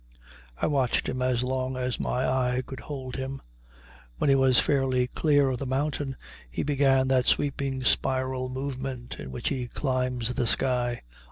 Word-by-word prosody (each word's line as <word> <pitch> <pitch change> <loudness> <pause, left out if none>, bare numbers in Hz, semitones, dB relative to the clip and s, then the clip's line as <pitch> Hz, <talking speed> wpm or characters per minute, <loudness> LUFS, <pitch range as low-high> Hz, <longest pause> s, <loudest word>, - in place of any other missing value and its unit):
I - - 0
watched 135 -5 +1
him 130 - -2
as 125 -1 +1
long 130 0 -2
as 125 -1 -2
my 125 - 0
eye 130 -1 +1
could 135 - -8
hold 130 -4 -6
him. 135 +1 -4 0.8
When 140 - +2
he - - +6
was 130 -3 +5
fairly 130 -3 +2
clear 145 +1 +2
of 125 - -3
the 140 - -3
mountain 140 0 -1 0.3
he - - -3
began 135 -2 +3
that 130 -1 +3
sweeping 135 -2 0
spiral 130 0 +1
movement 130 -2 -5
in - - -7
which 65 - -2
he 130 -3 -2
climbs 125 -2 -1
the 120 -1 0
sky. 120 +2 +1
130 Hz, 165 wpm, -27 LUFS, 125-135 Hz, 0.8 s, he